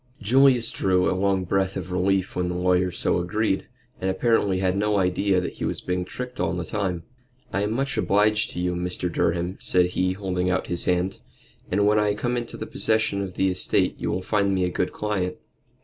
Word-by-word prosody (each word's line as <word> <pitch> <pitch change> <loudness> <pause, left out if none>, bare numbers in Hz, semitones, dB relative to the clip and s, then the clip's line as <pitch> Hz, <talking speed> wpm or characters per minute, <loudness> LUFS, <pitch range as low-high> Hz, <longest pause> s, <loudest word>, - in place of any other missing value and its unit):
Julius 125 +1 +4
drew 90 -1 +1
a - - +2
long 95 0 +1
breath 95 +1 0
of 90 -1 -6
relief 95 +1 0
when 90 -1 0
the 90 - -3
lawyer 90 0 +2
so 90 - 0
agreed, 100 +3 -1 0.3
and 95 - -1
apparently 105 -2 +2
had 95 0 +1
no 105 +1 +1
idea 95 +1 +2
that 90 - -5
he - - -5
was - - -1
being 90 0 -2
tricked 125 +6 -7
all - - 0
the 90 -1 -3
time. 90 -3 -2 0.5
"I 100 - +1
am 105 +2 0
much 135 +3 -1
obliged 105 +1 +2
to - - -5
you, 90 0 0
Mr. 90 0 -2
Durham," 85 +2 0
said 90 -1 +2
he, 90 +1 0
holding 90 -2 -2
out 90 0 0
his 85 - -1
hand, 90 +1 0 0.5
"and 100 +2 +2
when 105 +1 +4
I 105 -1 +1
come 120 +3 -1
into 120 -1 -4
possession 110 -2 0
of 95 -2 -5
the 95 - +2
estate 90 - +1
you - - -2
will 95 - -2
find 100 -1 +1
me 90 -1 +1
a - - 0
good 90 +1 -1
client." 100 -4 -2
95 Hz, 210 wpm, -24 LUFS, 90-105 Hz, 0.5 s, Julius